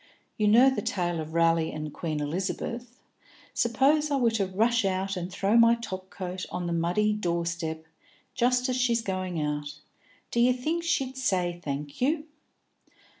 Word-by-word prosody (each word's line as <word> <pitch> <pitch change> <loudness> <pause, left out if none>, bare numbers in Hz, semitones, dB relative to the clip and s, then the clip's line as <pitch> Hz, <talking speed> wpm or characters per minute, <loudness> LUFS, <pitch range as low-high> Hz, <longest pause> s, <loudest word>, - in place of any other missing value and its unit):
You 215 - +1
know 245 +6 +7
the 265 - -2
tale 175 -3 -1
of 160 +1 -6
Raleigh 165 -1 +3
and 155 -1 -6
Queen 155 -3 -3
Elizabeth. 205 - -4 0.6
Suppose 275 +6 +2
I 285 - +1
were 240 -4 +3
to 210 -4 0
rush 225 +5 +2
out 195 +1 -1
and 180 0 -4
throw 195 +4 +1
my 230 0 +7
top 190 -5 -7
coat 185 -1 -5
on 180 - -3
the 170 - -1
muddy 180 +6 +1
door 170 -5 -1
step, 160 -2 -3 0.5
just 250 +1 +2
as 255 - 0
she's 235 -2 +2
going 185 -4 -3
out; 150 0 -3 0.5
d'ye 240 +1 +4
think 310 +7 -2
she'd 270 -6 -1
say 180 -8 0
thank 145 - -5
you?" 300 +4 +1
195 Hz, 165 wpm, -27 LUFS, 170-240 Hz, 0.6 s, know